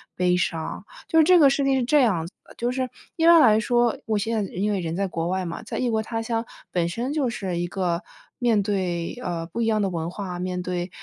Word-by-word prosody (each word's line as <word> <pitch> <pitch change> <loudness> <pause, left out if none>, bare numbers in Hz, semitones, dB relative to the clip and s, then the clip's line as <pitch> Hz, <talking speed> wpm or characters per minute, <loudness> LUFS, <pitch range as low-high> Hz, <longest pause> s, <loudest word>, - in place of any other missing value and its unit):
悲 180 0 +2
伤。 165 -3 -2 0.2
就 325 - +3
是 - - +7
这 360 +3 +6
个 300 -4 +7
事 280 +1 +1
情 270 -1 +2
是 250 - 0
这 295 +4 +4
样 190 -10 +2
子 170 - -11
的， - - -17
就 240 +1 -1
是 255 0 -2 0.3
一 325 - +2
般 340 0 +9
来 220 -7 +6
说， 240 +1 +1
我 215 -1 +1
现 220 +1 -1
在 195 - -6
因 205 +4 -1
为 200 - 0
人 165 -2 -3
在 200 +2 0
国 165 -2 -3
外 185 +1 -1
嘛， 170 +5 -5
在 220 - -6
异 245 -2 0
国 220 -1 +1
他 225 +1 -4
乡， 225 0 -1 0.3
本 170 -1 0
身 240 +10 -3
就 285 -5 +1
是 190 -6 -3
一 175 - -1
个 175 -2 -1 0.4
面 230 -5 +2
对， 185 -4 -2
呃， 170 -2 -3
不 180 +8 -5
一 - - +2
样 215 -1 +2
的 195 - +1
文 165 -1 -3
化， 180 -1 -6
面 180 0 -3
对， 180 0 -3
205 Hz, 280 characters per minute, -24 LUFS, 180-240 Hz, 0.4 s, 般